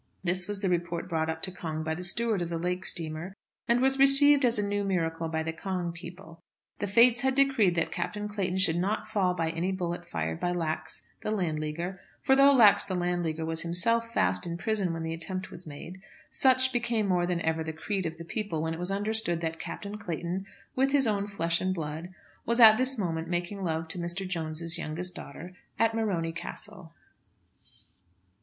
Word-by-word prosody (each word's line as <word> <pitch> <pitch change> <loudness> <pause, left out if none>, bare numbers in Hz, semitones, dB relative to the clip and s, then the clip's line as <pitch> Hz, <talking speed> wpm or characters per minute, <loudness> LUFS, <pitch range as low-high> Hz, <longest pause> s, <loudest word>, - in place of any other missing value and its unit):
This 180 0 +2
was 205 -1 -3
the 195 - 0
report 175 0 -2
brought 160 -2 -1
up 160 0 -4
to 190 - +2
Cong 160 -4 -5
by 160 0 -2
the 175 +3 -6
steward 215 +2 +1
of 170 - -3
the 170 - -2
lake 180 +2 -2
steamer, 165 +3 -3 0.3
and 235 +1 +3
was 270 0 +3
received 275 +1 +7
as 240 -2 +3
a 205 - 0
new 205 0 -1
miracle 165 -4 -1
by 160 0 -1
the 160 0 -3
Cong 180 0 -3
people. 170 0 -11 0.4
The 205 - -2
fates 235 +4 +6
had 265 -1 +1
decreed 265 -10 +4
that 165 - 0
Captain 210 +4 -3
Clayton 195 -3 -2
should 175 -3 +2
not 200 +4 -1
fall 195 -5 +1
by 165 -1 -1
any 170 +3 -2
bullet 175 -2 -4
fired 80 0 -3
by 175 - -1
Lax, 160 -3 -3 0.2
the - - -3
Landleaguer; 170 -1 -2 0.2
for, 265 - +4
though 275 +1 +7
Lax, 230 -7 +6
the 190 - -3
Landleaguer, 175 -3 -1
was 160 0 -2
himself 230 +8 0
fast 90 - +1
in 170 0 -4
prison 200 -1 0
when 165 0 -4
the 160 0 -3
attempt 185 +3 -5
was 175 -1 -6
made, 170 +5 -9 0.3
such 260 0 +4
became 235 -3 0
more 180 -2 +1
than 175 -1 0
ever 160 0 0
the 160 - -4
creed 185 +3 -3
of 160 0 -7
the 170 - -9
people 200 -3 -3
when 160 0 -1
it 165 - -6
was 180 +1 0
understood 200 -3 0
that 160 -1 -3
Captain 205 +1 -6
Clayton, 175 +1 -4 0.3
with 270 +1 +2
his 280 -2 +4
own 205 -2 0
flesh 170 -4 -1
and 185 0 0
blood, 160 +2 -5 0.3
was 235 +2 0
at 220 -2 +10
this 260 +1 +2
moment 165 -5 -2
making 175 +3 -3
love 165 -2 -2
to 180 - -4
Mr. 175 +3 -2
Jones's 165 -1 -1
youngest 175 +3 -3
daughter 170 +4 -9 0.2
at 225 +1 +2
Morony 190 -8 -1
Castle. 175 +1 -7
180 Hz, 205 wpm, -28 LUFS, 165-210 Hz, 0.4 s, at